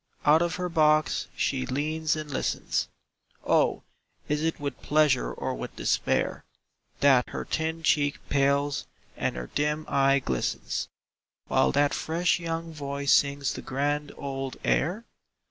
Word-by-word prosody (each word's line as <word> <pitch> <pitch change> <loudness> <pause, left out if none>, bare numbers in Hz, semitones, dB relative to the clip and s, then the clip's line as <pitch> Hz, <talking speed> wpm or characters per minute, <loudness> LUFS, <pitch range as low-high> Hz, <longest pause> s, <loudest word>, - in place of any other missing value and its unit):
Out 155 +2 +6
of 175 0 0
her 180 0 -2
box 155 -2 +2
she 65 - -1
leans 155 +3 0
and 155 -1 -6
listens; 130 - -1 0.6
Oh, - - +2 0.4
is 150 0 0
it 160 +1 -1
with 140 -3 -5
pleasure 150 - +2
or - - -3
with - - -6
despair - - 0 0.6
That 135 -3 +5
her - - -5
thin 160 +1 -2
cheek 145 -1 +2
pales 140 +1 +1 0.3
and - - -1
her - - -6
dim 150 +1 0
eye 135 0 +3
glistens, 65 - -2 0.6
While 65 - +3
that 145 0 +3
fresh 170 +2 +1
young 165 -1 -4
voice 140 -1 0
sings 140 -1 +2
the - - -6
grand 145 +2 -1
old 135 -1 -4
air? 185 +10 +1
145 Hz, 140 wpm, -27 LUFS, 140-160 Hz, 0.6 s, Out